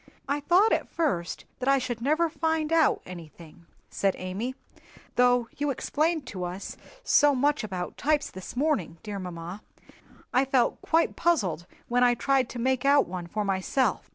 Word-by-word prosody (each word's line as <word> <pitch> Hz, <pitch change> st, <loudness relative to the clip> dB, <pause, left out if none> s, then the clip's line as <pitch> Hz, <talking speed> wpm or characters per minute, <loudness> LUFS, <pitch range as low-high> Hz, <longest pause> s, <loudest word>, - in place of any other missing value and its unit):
"I 285 Hz, +2 st, 0 dB
thought 360 Hz, +9 st, +4 dB
at -, -, -1 dB
first 190 Hz, -, -2 dB
that 260 Hz, +1 st, 0 dB
I 275 Hz, -, +5 dB
should 245 Hz, -3 st, -3 dB
never 310 Hz, +6 st, +2 dB
find 320 Hz, 0 st, -1 dB
out 325 Hz, -1 st, +3 dB
anything," 170 Hz, -1 st, -12 dB, 0.2 s
said 195 Hz, -1 st, +1 dB
Amy; 200 Hz, +8 st, -4 dB, 0.6 s
"though 245 Hz, -1 st, +4 dB
you 290 Hz, 0 st, 0 dB
explained 310 Hz, +3 st, 0 dB
to 185 Hz, -2 st, -5 dB
us 180 Hz, +2 st, -5 dB, 0.3 s
so 290 Hz, -, +4 dB
much 285 Hz, +1 st, +1 dB
about 185 Hz, -4 st, -5 dB
types 300 Hz, 0 st, +1 dB
this 185 Hz, +4 st, -9 dB
morning, 245 Hz, -, 0 dB
dear 205 Hz, -2 st, -5 dB
mamma, 180 Hz, +1 st, -7 dB, 0.7 s
I 255 Hz, -, +4 dB
felt 265 Hz, -3 st, +1 dB
quite 325 Hz, +1 st, +1 dB
puzzled 200 Hz, -, 0 dB, 0.2 s
when 245 Hz, +1 st, +2 dB
I 245 Hz, -1 st, +4 dB
tried 265 Hz, 0 st, +1 dB
to -, -, -7 dB
make 260 Hz, +2 st, 0 dB
out 280 Hz, 0 st, +4 dB
one 175 Hz, -1 st, -6 dB
for 210 Hz, +4 st, -2 dB
myself. 195 Hz, +4 st, 0 dB
250 Hz, 165 wpm, -27 LUFS, 190-290 Hz, 0.7 s, I